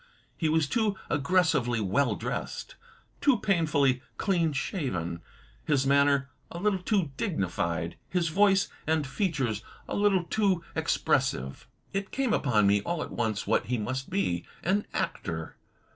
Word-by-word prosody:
He 160 Hz, -, 0 dB
was 160 Hz, -1 st, +2 dB
too 215 Hz, +2 st, +1 dB, 0.2 s
aggressively 145 Hz, -5 st, +2 dB
well 110 Hz, +3 st, +1 dB
dressed; -, -, -4 dB, 0.5 s
too 280 Hz, -4 st, +4 dB
pain 175 Hz, -6 st, +2 dB
fully 135 Hz, -4 st, +2 dB, 0.2 s
clean 170 Hz, -5 st, +1 dB
shaven; 95 Hz, -, -2 dB, 0.4 s
his 140 Hz, -3 st, +1 dB
manner 140 Hz, 0 st, +3 dB, 0.2 s
a -, -, -7 dB
little 195 Hz, +1 st, +1 dB
too 185 Hz, -6 st, +1 dB
dignified; 85 Hz, -, -1 dB
his 175 Hz, -2 st, +1 dB
voice 195 Hz, +2 st, +4 dB, 0.2 s
and 160 Hz, -2 st, +2 dB
features 135 Hz, -, -1 dB, 0.3 s
a -, -, -3 dB
little 200 Hz, -3 st, +3 dB
too 190 Hz, -2 st, +1 dB
expressive. 65 Hz, +1 st, 0 dB, 0.3 s
It 195 Hz, 0 st, -2 dB
came 260 Hz, -4 st, 0 dB
upon 110 Hz, -7 st, +3 dB
me 100 Hz, +1 st, +4 dB
all 170 Hz, +7 st, -2 dB
at -, -, -8 dB
once 110 Hz, -4 st, -1 dB
what -, -, +1 dB
he 125 Hz, +1 st, 0 dB
must 130 Hz, +5 st, -3 dB
be 85 Hz, -, 0 dB
— -, -, -26 dB
an 200 Hz, +4 st, +1 dB
actor. -, -, -3 dB
150 Hz, 145 wpm, -28 LUFS, 120-190 Hz, 0.5 s, too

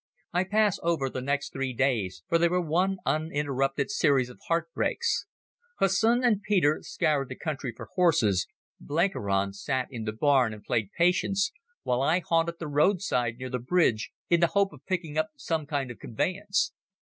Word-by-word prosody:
I 180 Hz, +2 st, +2 dB
pass 210 Hz, 0 st, +2 dB
over 160 Hz, -6 st, 0 dB
the 130 Hz, -, -4 dB
next 140 Hz, +2 st, -2 dB
three 135 Hz, -1 st, -2 dB
days, 110 Hz, -10 st, 0 dB
for 165 Hz, -, +2 dB
they 170 Hz, 0 st, +4 dB
were 180 Hz, +1 st, +1 dB
one 180 Hz, +4 st, +1 dB
uninterrupted 145 Hz, -2 st, 0 dB
series 140 Hz, -10 st, +2 dB
of -, -, -16 dB
heart 165 Hz, 0 st, 0 dB
breaks. 470 Hz, 0 st, 0 dB, 0.5 s
Hussin 230 Hz, +6 st, +3 dB
and 220 Hz, -5 st, +3 dB
Peter 175 Hz, -8 st, +2 dB
scoured 140 Hz, -4 st, 0 dB
the -, -, -6 dB
country 145 Hz, -5 st, -4 dB
for -, -, -9 dB
horses, 150 Hz, -, +3 dB, 0.3 s
Blenkiron 100 Hz, -, 0 dB
sat 130 Hz, +5 st, -2 dB
in 115 Hz, -4 st, -5 dB
the 110 Hz, -, -1 dB
barn 125 Hz, -1 st, +2 dB
and 105 Hz, -, -14 dB
played 110 Hz, -4 st, -1 dB
Patience, 190 Hz, +3 st, +2 dB, 0.3 s
while 125 Hz, +1 st, 0 dB
I 155 Hz, +5 st, +3 dB
haunted 165 Hz, -1 st, 0 dB
the 165 Hz, -, -5 dB
roadside 145 Hz, -, +1 dB
near 130 Hz, 0 st, -6 dB
the 125 Hz, -, -1 dB
bridge 125 Hz, -4 st, +1 dB, 0.2 s
in 170 Hz, -, +3 dB
the 170 Hz, -, +4 dB
hope 200 Hz, -1 st, +3 dB
of -, -, -16 dB
picking 165 Hz, -5 st, -2 dB
up 155 Hz, 0 st, 0 dB
some 160 Hz, -3 st, -2 dB
kind 140 Hz, -4 st, -2 dB
of 120 Hz, -, -11 dB
conveyance. 190 Hz, -, -1 dB
150 Hz, 175 wpm, -28 LUFS, 130-180 Hz, 0.5 s, they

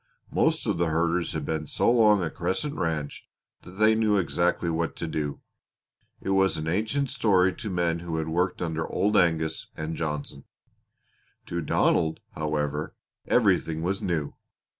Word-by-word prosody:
Most -, -, +1 dB
of -, -, 0 dB
the 85 Hz, -, +2 dB
herders 85 Hz, +2 st, 0 dB
had 80 Hz, -2 st, -3 dB
been 80 Hz, 0 st, -2 dB
so -, -, +2 dB
long 105 Hz, -5 st, +5 dB
at 80 Hz, -, -3 dB
Crescent 95 Hz, +12 st, -2 dB
Ranch 80 Hz, -, -3 dB, 0.3 s
that 90 Hz, -, -13 dB
they 110 Hz, +3 st, +4 dB
knew 110 Hz, -2 st, +2 dB
exactly 85 Hz, -1 st, +1 dB
what 85 Hz, 0 st, -1 dB
to -, -, -4 dB
do. 75 Hz, -3 st, -3 dB, 0.8 s
It 95 Hz, -, -3 dB
was 95 Hz, -3 st, +3 dB
an 80 Hz, 0 st, -4 dB
ancient 110 Hz, -, 0 dB
story 95 Hz, -4 st, +3 dB
to 115 Hz, -5 st, -5 dB
men 85 Hz, -2 st, 0 dB
who 85 Hz, -1 st, -4 dB
had 80 Hz, -1 st, -2 dB
worked 90 Hz, +3 st, 0 dB
under 80 Hz, -1 st, -2 dB
Old 105 Hz, +1 st, 0 dB
Angus 80 Hz, -3 st, +1 dB
and 80 Hz, +1 st, -3 dB
Johnson. 75 Hz, -3 st, -4 dB, 1.0 s
To 85 Hz, 0 st, -3 dB
Donald, 80 Hz, +1 st, +2 dB
however, 75 Hz, -1 st, -2 dB, 0.3 s
everything 80 Hz, 0 st, +2 dB
was 95 Hz, +3 st, -1 dB
new. 80 Hz, -5 st, -1 dB
85 Hz, 160 wpm, -26 LUFS, 80-95 Hz, 1.0 s, long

